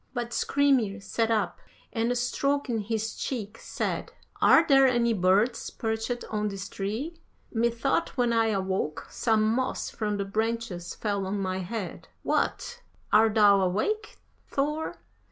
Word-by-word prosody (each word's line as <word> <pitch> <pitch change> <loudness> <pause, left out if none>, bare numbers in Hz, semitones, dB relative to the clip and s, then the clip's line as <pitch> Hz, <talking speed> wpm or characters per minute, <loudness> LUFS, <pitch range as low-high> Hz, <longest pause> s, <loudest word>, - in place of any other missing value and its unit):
But 240 -1 -3
Skrymir 260 -8 +2
sat 225 +3 -1
up, 215 -5 0 0.3
and 235 +2 0
stroking 265 0 0
his 220 +1 -2
cheek, 225 -4 -4
said - - -3 0.3
"'Are 325 - +7
there 270 -3 +6
any 240 -2 +2
birds 200 +5 +2
perched 225 +1 -3
on 210 -1 0
this 195 -1 -5
tree? 225 - -4 0.3
Methought 235 +7 0
when 240 -2 +2
I 225 -1 +3
awoke 190 -6 -1
some 220 -2 +2
moss 255 +4 -1
from 210 -2 -2
the 200 - -2
branches 220 -3 -2
fell 200 -3 -2
on 200 +1 -2
my 185 -1 -2
head. 190 0 -5 0.2
What! 480 0 -1 0.3
Art 220 +1 +5
thou 205 -2 +6
awake, 315 - -1 0.3
Thor? 300 +3 -1
225 Hz, 135 wpm, -27 LUFS, 200-245 Hz, 0.3 s, Are